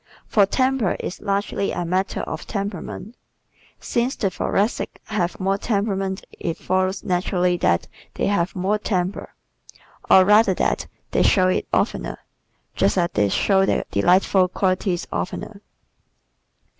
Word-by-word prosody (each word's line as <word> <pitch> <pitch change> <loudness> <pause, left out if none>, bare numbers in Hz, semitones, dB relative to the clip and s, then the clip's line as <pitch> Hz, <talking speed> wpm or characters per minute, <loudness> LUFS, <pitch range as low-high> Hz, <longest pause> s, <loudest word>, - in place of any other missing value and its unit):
For 200 -3 +3
temper 255 -3 +1
is - - -5
largely 200 0 -1
a 175 - -3
matter 185 +3 -1
of - - -6
temperament. 200 +2 -5 0.6
Since 245 +2 -1
the 195 -4 -1
Thoracics 205 +5 -1
have 185 -5 -2
more 195 +1 0
"temperament" 195 -3 -1
it 165 - -3
follows 185 +1 -1
naturally 180 0 +1
that 85 - +1 0.3
they - - -1
have 185 -3 0
more 195 +3 0
temper, 185 -2 -2 0.7
or 185 - +7
rather 210 -1 +5
that - - 0 0.2
they - - +2
show 185 -2 +4
it - - 0
oftener, - - -1 0.6
just - - +2
as 175 -1 +1
they 105 -1 +2
show 195 - +3
their - - +1
delightful 185 +1 +3
qualities 185 -1 0
oftener. 200 +2 -4
190 Hz, 130 wpm, -22 LUFS, 180-205 Hz, 0.7 s, or